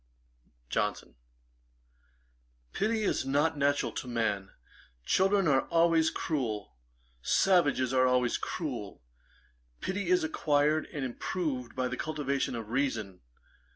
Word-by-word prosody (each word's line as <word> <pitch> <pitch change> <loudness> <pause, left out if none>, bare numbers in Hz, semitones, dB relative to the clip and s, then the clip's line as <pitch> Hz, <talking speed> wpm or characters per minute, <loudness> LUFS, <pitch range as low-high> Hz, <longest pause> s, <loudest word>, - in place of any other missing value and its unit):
JOHNSON. - - -1 1.6
'Pity 220 +1 0
is - - +1
not 145 +4 +1
natural 145 0 +1
to - - -5
man. 105 -5 -1 0.6
Children 195 0 +3
are 135 -2 +3
always 165 -1 +3
cruel. 115 - -3 0.5
Savages 145 - +3
are 130 0 +4
always 125 -1 +2
cruel. - - -5 0.8
Pity 190 -1 -3
is 180 -2 +4
acquired 155 0 +1
and 140 -3 -4
improved 130 -2 -3
by 130 -1 0
the - - -4
cultivation 140 -5 -2
of 115 -2 -6
reason. 115 -7 -2
140 Hz, 110 wpm, -30 LUFS, 125-165 Hz, 1.6 s, are